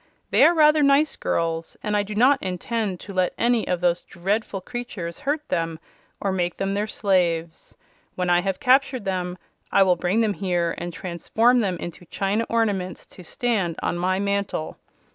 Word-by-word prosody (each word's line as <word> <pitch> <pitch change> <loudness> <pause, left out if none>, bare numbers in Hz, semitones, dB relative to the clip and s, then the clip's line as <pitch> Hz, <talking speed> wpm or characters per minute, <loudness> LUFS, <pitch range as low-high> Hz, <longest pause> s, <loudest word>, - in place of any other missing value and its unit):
They - - +5
are 345 - +5
rather 305 -1 +5
nice 280 +2 +4
girls, 165 0 -2
and 210 0 -1
I 205 - +3
do 205 +1 -6
not 260 +5 +4
intend 190 +1 -2
to 200 - -9
let 185 -1 0
any 235 -1 +2
of 180 -1 -1
those 175 -1 +2
dreadful 195 +3 -2
creatures 200 -6 -6
hurt 295 +1 -2
them, 165 -1 -1 0.4
or 200 - -1
make 175 -2 -1
them 195 0 -1
their 205 +2 -1
slaves. 170 -6 -1 0.4
When 180 -1 -1
I 175 0 +4
have 190 0 -2
captured 260 -3 +3
them 180 -1 -2 0.3
I 195 - +6
will 185 -2 +3
bring 180 +6 +1
them 215 -2 +1
here 175 -4 -1
and 175 - -4
transform 190 +8 +1
them 190 -6 0
into 175 +1 -8
china 200 +6 -1
ornaments 200 -6 -1
to 180 - -12
stand 195 -4 -1
on - - 0
my 185 +2 0
mantle. 200 -4 -2
195 Hz, 180 wpm, -24 LUFS, 175-230 Hz, 0.4 s, I